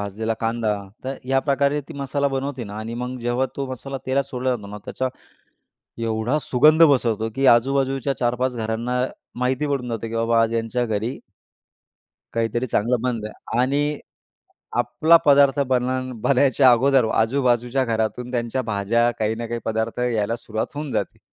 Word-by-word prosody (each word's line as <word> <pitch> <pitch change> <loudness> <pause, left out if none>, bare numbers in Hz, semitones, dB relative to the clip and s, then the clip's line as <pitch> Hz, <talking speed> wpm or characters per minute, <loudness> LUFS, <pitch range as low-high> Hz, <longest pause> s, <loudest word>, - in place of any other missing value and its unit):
भाजलेला 110 +3 -2
कांदा, 115 -1 0 0.3
तर 135 +1 -3
ह्या 135 +1 +2
प्रकारे 140 +2 +2
ती - - -7
मसाला 140 +1 0
बनवते 135 -2 -3
ना - - -7
आणि 115 +2 -5
मग 125 0 -4
जेव्हा 120 +2 0
तो 140 -1 -2
मसाला 135 +2 -5
तेलात 135 +1 +1
सोडला 130 0 -1
जातो 105 -4 -7
ना, 105 +1 -8
त्याच्या 130 0 -2 1.0
एवढा 110 +6 0
सुगंध 155 +6 +5
पसरतो, 115 -4 0
की 135 0 +1
आजूबाजूच्या 135 +1 0
4-5 125 +1 0
घरांना 115 +3 -2 0.5
माहिती 130 +3 0
पडून 125 -2 -4
जाते, 115 0 -3
की 115 - -6
"बाबा 115 0 +2
आज 115 0 0
यांच्या 115 +2 -1
घरी" 110 +3 -2 1.2
"काहीतरी 115 +2 0
चांगलं 120 +2 +1
बनलंय." 115 -3 -3 0.3
आणि 145 +3 +1 0.8
आपला 165 +2 +4
पदार्थ 140 -1 +5
बनान 130 0 0
बनायच्या 130 -1 +4
अगोदर 130 0 +4
आजूबाजूच्या 125 +2 +1
घरातून 115 +2 -2
त्यांच्या 120 +1 -1
भाज्या, 110 +2 +1
काही 110 +1 0
ना 115 +1 -4
काही 120 0 -3
पदार्थ 110 +2 -2
यायला 115 -2 0
सुरुवात 110 -2 -3
होऊन 145 -2 -4
जाते. - - -3
125 Hz, 155 wpm, -22 LUFS, 115-135 Hz, 1.2 s, सुगंध